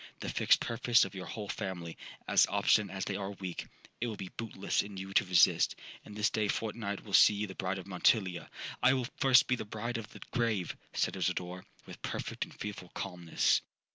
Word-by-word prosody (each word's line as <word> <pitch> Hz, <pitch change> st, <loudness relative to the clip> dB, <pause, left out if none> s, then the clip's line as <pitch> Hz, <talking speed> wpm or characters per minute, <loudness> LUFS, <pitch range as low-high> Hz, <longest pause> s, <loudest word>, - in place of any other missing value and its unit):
The -, -, -4 dB
fixed -, -, +3 dB
purpose 120 Hz, 0 st, +3 dB
of 95 Hz, -, -8 dB
your 95 Hz, -2 st, -6 dB
whole 105 Hz, -2 st, -5 dB
family, 90 Hz, -5 st, -4 dB, 0.3 s
as -, -, +5 dB
obstinate 100 Hz, -1 st, +2 dB
as 95 Hz, -, -2 dB
they 100 Hz, -, -2 dB
are 100 Hz, 0 st, -4 dB
weak, 95 Hz, -3 st, -6 dB, 0.3 s
it 120 Hz, -, -1 dB
will 110 Hz, -, -3 dB
be 95 Hz, -2 st, -7 dB
bootless 105 Hz, -4 st, -1 dB
in 100 Hz, -1 st, -8 dB
you 95 Hz, +1 st, -6 dB
to -, -, +4 dB
resist; 90 Hz, -2 st, +4 dB, 0.3 s
and 105 Hz, -, -11 dB
this 105 Hz, +1 st, +1 dB
day 110 Hz, -1 st, +1 dB
fortnight 105 Hz, -1 st, -3 dB
will 100 Hz, -, -10 dB
see 105 Hz, -, +7 dB
you 105 Hz, +1 st, -1 dB
the 95 Hz, -, -8 dB
bride 95 Hz, 0 st, -2 dB
of 95 Hz, -, -7 dB
Montilla.'—'I 95 Hz, +5 st, +1 dB
will 125 Hz, -2 st, -1 dB
first 130 Hz, -2 st, +6 dB
be 125 Hz, -, +1 dB
the -, -, -5 dB
bride 110 Hz, +3 st, -4 dB
of 110 Hz, -1 st, -8 dB
the -, -, -13 dB
grave,' 110 Hz, -7 st, 0 dB, 0.2 s
said -, -, 0 dB
Isidora, 90 Hz, +1 st, -2 dB, 0.2 s
with -, -, -11 dB
perfect -, -, -3 dB
and -, -, -15 dB
fearful 100 Hz, -4 st, -6 dB
calmness. 90 Hz, -4 st, +1 dB
100 Hz, 200 wpm, -32 LUFS, 95-110 Hz, 0.3 s, see